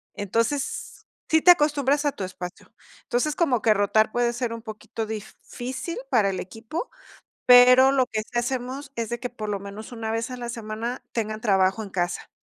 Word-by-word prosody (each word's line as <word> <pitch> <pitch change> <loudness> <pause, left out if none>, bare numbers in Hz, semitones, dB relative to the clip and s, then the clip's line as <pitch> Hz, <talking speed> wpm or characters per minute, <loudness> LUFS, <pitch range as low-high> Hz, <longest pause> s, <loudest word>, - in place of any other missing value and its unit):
Entonces, 230 +7 -2 0.2
sí 320 0 +4
te 355 - +9
acostumbras 295 -2 +2
a 285 - +1
tu 195 - -6
espacio. 180 -1 -8 0.3
Entonces, 285 +5 0
como 260 -10 +2
que 220 - +4
rotar 215 +2 +2
puede 240 0 +2
ser 240 -1 -2
un 230 - -7
poquito 220 0 -6
difícil 245 - -6
para 215 -6 +3
el 190 - -3
equipo, 225 - -6 0.6
pero 250 +1 +8
lo 265 -2 +3
que 220 -3 -3
sí 240 - -6
hacemos 260 +3 -4
es 230 -2 -3
de 240 - -3
que, 250 - -4
por 215 -3 -6
lo 200 -1 -2
menos, 200 +4 -9
una 225 -2 -4
vez 225 +2 -2
a 250 - -5
la 240 -1 -5
semana 230 +2 -5
tengan 215 -2 -3
trabajo 195 -1 +2
en 205 - -8
casa. 175 -2 -2
230 Hz, 190 wpm, -25 LUFS, 215-260 Hz, 0.6 s, te